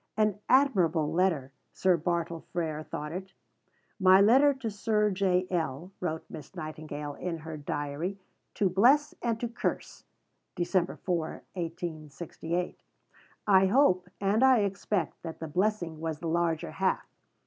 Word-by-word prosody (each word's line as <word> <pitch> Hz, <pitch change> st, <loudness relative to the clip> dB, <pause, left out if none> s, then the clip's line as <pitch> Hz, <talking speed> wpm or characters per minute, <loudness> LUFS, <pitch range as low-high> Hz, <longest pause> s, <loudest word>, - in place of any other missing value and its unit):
An 210 Hz, -2 st, +2 dB
"admirable" 180 Hz, -, +3 dB
letter, 165 Hz, -7 st, +1 dB, 0.2 s
Sir 185 Hz, -1 st, +3 dB
Bartle 170 Hz, 0 st, -1 dB
Frere 160 Hz, -3 st, -2 dB
thought 150 Hz, 0 st, -6 dB
it; 190 Hz, +2 st, -6 dB, 0.7 s
"my 190 Hz, 0 st, +7 dB
letter 260 Hz, +8 st, +6 dB
to 260 Hz, -5 st, -4 dB
Sir 210 Hz, 0 st, +1 dB
J. 185 Hz, -1 st, +2 dB
L.," 165 Hz, 0 st, -2 dB
wrote 160 Hz, -3 st, -3 dB
Miss 150 Hz, -3 st, -10 dB
Nightingale 155 Hz, -1 st, -6 dB
in 170 Hz, +2 st, -4 dB
her 160 Hz, 0 st, -7 dB
diary, 145 Hz, +5 st, -3 dB, 0.4 s
"to 200 Hz, -, +2 dB
bless 255 Hz, +11 st, +4 dB
and 230 Hz, -2 st, -1 dB
to 240 Hz, -, -1 dB
curse" 235 Hz, +1 st, -4 dB, 0.5 s
(Dec. 175 Hz, 0 st, 0 dB
4, 170 Hz, -4 st, 0 dB, 0.3 s
1868). 165 Hz, 0 st, -4 dB, 0.7 s
I 195 Hz, -2 st, +5 dB
hope, 185 Hz, -6 st, +3 dB
and 205 Hz, +5 st, +2 dB
I 260 Hz, -4 st, +6 dB
expect, 195 Hz, -2 st, -2 dB
that 165 Hz, -1 st, -6 dB
the 160 Hz, -, -5 dB
blessing 175 Hz, -1 st, -1 dB
was 160 Hz, -1 st, -3 dB
the 165 Hz, -, -5 dB
larger 165 Hz, -, 0 dB
half. -, -, 0 dB
180 Hz, 135 wpm, -29 LUFS, 160-200 Hz, 0.7 s, my